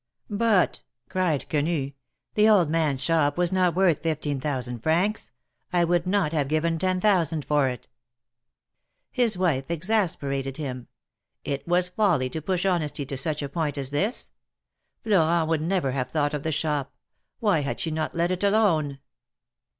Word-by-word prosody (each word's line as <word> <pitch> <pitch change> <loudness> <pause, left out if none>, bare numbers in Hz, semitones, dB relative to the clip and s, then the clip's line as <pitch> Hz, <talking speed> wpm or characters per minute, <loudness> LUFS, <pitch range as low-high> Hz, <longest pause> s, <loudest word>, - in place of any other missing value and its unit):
"But," 205 -3 +2 0.3
cried 180 -6 0
Quenu, 150 -2 -1 0.4
"the 215 +1 +4
old 180 -8 +4
man's 155 -5 +1
shop 160 -3 +1
was 175 -1 +2
not 180 -3 +2
worth 180 -5 +3
fifteen 150 -4 -2
thousand 125 -4 -3
francs. 180 - 0 0.4
I 175 -1 +3
would 175 +1 +1
not 185 -5 +1
have 145 -4 0
given 160 +2 0
ten 185 0 0
thousand 170 -7 +1
for 145 -3 +2
it! 125 -3 -7 0.7
" - - -58 0.3
His 235 -6 +2
wife 160 -7 0
exasperated 155 -8 -1
him; 130 -5 -5 0.6
it 140 +2 -4
was 180 +1 +2
folly 180 -10 +1
to 160 - -4
push 180 +3 -1
honesty 155 -6 0
to 135 +1 -5
such 150 +2 -1
a - - -2
point 150 -2 -2
as 135 -1 -3
this; 65 - -1 0.7
Florent 170 -6 +2
would 160 -2 +1
never 170 -4 0
have 130 -1 -2
thought 145 -2 0
of 150 - -2
the 160 - -2
shop; 150 -2 -2 0.4
why 205 -8 +2
had 140 -1 -3
she 160 - -1
not 155 +1 -3
let 170 +1 +1
it 185 +2 -2
alone 185 -9 +2
160 Hz, 165 wpm, -25 LUFS, 145-180 Hz, 0.7 s, the